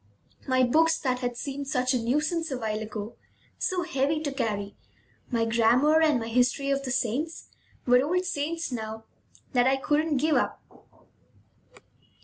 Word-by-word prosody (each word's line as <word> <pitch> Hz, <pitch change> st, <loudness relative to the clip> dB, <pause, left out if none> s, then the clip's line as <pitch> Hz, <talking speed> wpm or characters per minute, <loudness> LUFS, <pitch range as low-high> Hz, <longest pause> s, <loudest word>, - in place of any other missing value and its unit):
My 255 Hz, -1 st, +3 dB
books, 320 Hz, +6 st, +3 dB
that 255 Hz, -3 st, -1 dB
had 245 Hz, -1 st, -3 dB
seemed 280 Hz, +1 st, -5 dB
such 255 Hz, 0 st, +1 dB
a 250 Hz, -, +1 dB
nuisance 305 Hz, +7 st, 0 dB
a 265 Hz, -, -3 dB
while 215 Hz, -3 st, -2 dB
ago, 215 Hz, 0 st, -6 dB, 0.4 s
so 365 Hz, -1 st, 0 dB
heavy 305 Hz, -2 st, 0 dB
to 290 Hz, -2 st, -2 dB
carry, 205 Hz, -6 st, -3 dB, 0.5 s
my 230 Hz, -3 st, +1 dB
grammar, 240 Hz, +7 st, +4 dB
and 305 Hz, -5 st, +3 dB
my 225 Hz, -, -5 dB
history 250 Hz, +4 st, +1 dB
of 275 Hz, 0 st, +1 dB
the 270 Hz, -, -5 dB
saints, 260 Hz, +6 st, -2 dB, 0.4 s
were 250 Hz, 0 st, +5 dB
old 360 Hz, +5 st, 0 dB
friends 330 Hz, 0 st, -2 dB
now 220 Hz, -2 st, -5 dB, 0.5 s
that 245 Hz, -1 st, +4 dB
I 265 Hz, -, +4 dB
couldn't 300 Hz, +1 st, +1 dB
give 310 Hz, +3 st, +2 dB
up. -, -, -1 dB
265 Hz, 155 wpm, -27 LUFS, 240-305 Hz, 0.5 s, were